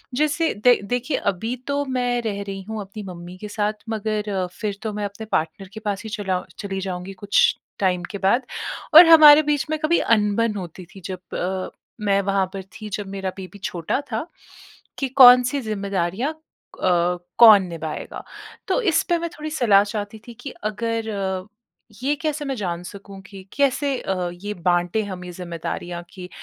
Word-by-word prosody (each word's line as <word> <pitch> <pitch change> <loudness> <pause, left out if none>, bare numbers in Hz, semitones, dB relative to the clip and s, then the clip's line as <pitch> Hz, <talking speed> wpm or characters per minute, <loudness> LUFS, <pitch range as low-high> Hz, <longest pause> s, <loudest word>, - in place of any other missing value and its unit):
जिससे 305 +3 +1
द 245 - +8
देखिए 250 +4 -1
अभी 225 +6 -4
तो 285 0 0
मैं 245 -2 0
रह 205 -3 -3
रही 195 -1 -6
हूँ 220 -1 -4
अपनी 200 +2 -8
मम्मी 180 -1 -9
के 210 - -7
साथ 210 0 -1 0.2
मगर 210 -3 -2
फिर 205 -2 -2
तो 220 -2 -3
मैं 205 0 -3
अपने 205 +2 -7
पार्टनर 185 +4 -1
के 220 - -7
पास 200 0 -2
ही 220 - -6
चला 190 -4 -2 0.2
चली 195 -2 -4
जाऊँगी 185 0 -5
कुछ 205 - +4 0.2
टाइम 180 -2 +1
के 200 - -4
बाद। 220 +7 +2 0.5
और 340 +3 +12
हमारे 310 -2 +10
बीच 290 -2 0
में 310 - +1
कभी 310 +3 +2 0.2
अनबन 210 +1 +1
होती 180 -1 -8
थी 195 - -11
जब 185 -1 -7
अ, 185 +1 -2 0.3
मैं 200 -1 +2
वहाँ 195 -1 +1
पर 195 -1 -5 0.2
थी 215 - -6
जब 205 - -6
मेरा 190 -1 -2
बेबी 190 +2 -9
छोटा 175 - -2
था 225 +9 -2 0.7
कि 270 - 0
कौन-सी 250 +1 +7
ज़िम्मेदारियाँ 200 - -2
अ, 180 - -2 0.2
कौन 215 -4 +9
निभाएगा। 160 -2 -6 0.4
तो 385 +5 +1
इसपे 345 -3 +2
मैं 340 0 -3
थोड़ी 310 -1 -7
सलाह 220 -9 +4
चाहती 210 0 -5
थी 240 - -9
कि 280 - -6 0.2
अगर 225 +1 -2
अ, 190 -2 -3 0.6
ये 285 +2 +2
कैसे 305 -1 -2
मैं 270 -1 -2
जान 175 -6 -3
सकूँ 195 +1 -10
कि 195 -2 -10
कैसे 280 0 +1
अ, 185 -2 -2
ये 205 +4 -6
बाँटे 175 +3 0
हम 185 -3 -6
ये 180 - -7
ज़िम्मेदारियाँ 175 0 -5
कि 180 -1 -9
205 Hz, 175 wpm, -22 LUFS, 190-245 Hz, 0.7 s, और